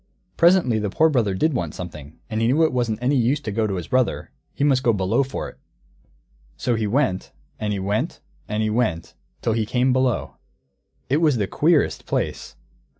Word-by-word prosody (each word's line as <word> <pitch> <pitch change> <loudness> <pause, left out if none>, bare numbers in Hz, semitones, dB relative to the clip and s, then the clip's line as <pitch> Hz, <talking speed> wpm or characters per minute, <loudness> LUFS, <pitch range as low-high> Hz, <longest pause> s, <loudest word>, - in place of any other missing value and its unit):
Presently 170 -10 +4
the 105 -1 -2
Poor 160 +10 +3
Brother 115 -9 +1
did 155 +11 +1
want 85 - -3
something, 75 -4 -9
and 110 -1 -2
he 115 - +2
knew 145 +7 +3
it 160 - +2
wasn't 120 -4 0
any 135 +3 +2
use 125 +4 +2
to 110 - -4
go 110 +1 0
to 100 - -2
his 90 -3 -5
brother; 130 -1 0 0.2
he - - -3
must 135 -3 +3
go 120 -3 +3
Below 95 +5 +1
for 135 0 -4
it. - - -13 1.0
So 125 - 0
he 110 -2 0
went, 100 -5 0 0.3
and 105 -1 -2
he 100 - -1
went, 100 +3 -2 0.3
and 105 +1 -1
he 110 - 0
went, 105 -8 -1 0.3
till 115 - +1
he 110 0 +1
came 125 +4 +1
Below. 130 -2 0 0.7
It 140 - +2
was 155 -5 +3
the 105 - +1
queerest 150 - +1
place! - - -3
115 Hz, 200 wpm, -22 LUFS, 105-135 Hz, 1.0 s, Presently